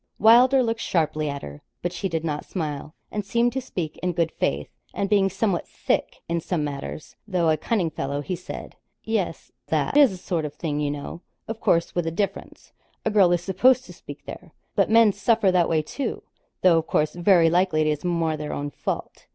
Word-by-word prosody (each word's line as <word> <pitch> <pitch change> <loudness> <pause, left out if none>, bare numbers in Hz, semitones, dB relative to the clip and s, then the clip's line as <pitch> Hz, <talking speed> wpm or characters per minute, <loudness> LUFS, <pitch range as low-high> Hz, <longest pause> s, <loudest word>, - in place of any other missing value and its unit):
Wylder 250 +4 +6
looked 230 -1 -1
sharply 155 -3 0
at 140 0 -5
her, 75 0 -9 0.2
but 175 0 -1
she 195 +2 -2
did 165 -2 -2
not 150 -2 -2
smile, 150 -3 -5 0.2
and 210 - -2
seemed 235 +4 +1
to 265 - -2
speak 175 -10 -5
in 180 -1 -1
good 165 -1 0
faith; 70 +1 -1 0.3
and 200 - 0
being 195 -2 +4
somewhat 190 -2 -1
thick - - -2
in 170 0 -1
some 165 -2 -1
matters, 145 +1 -6
though 175 -5 +2
a - - +3
cunning 175 +1 -1
fellow, 140 0 -3
he 180 +5 -3
said 180 - -8 0.3
'Yes; 210 -7 -2 0.2
that 155 - 0
is 290 -3 +7
the 190 - -7
sort 175 -2 -2
of 150 -1 -5
thing, 150 -2 -2
you 145 -1 0
know 145 +3 -6 0.3
of 225 0 -5
course, 170 -5 +2
with 175 -2 -1
a - - 0
difference 195 +3 -4 0.3
a 220 - +1
girl 195 -4 +5
is 175 -1 +1
supposed 250 +8 +3
to - - -11
speak - - -11
there; - - -10 0.2
but - - +2
men 225 -2 +6
suffer 200 -1 +2
that 180 -2 +3
way, 155 -2 +2
too 275 - -4 0.4
though, 175 -3 +6
of 160 - -6
course, 150 0 +1
very 175 -2 +4
likely 175 -3 +2
it's 150 -1 -1
more 170 -3 0
their 150 -1 -5
own 145 0 -4
fault.' - - -5
175 Hz, 210 wpm, -24 LUFS, 155-200 Hz, 0.4 s, is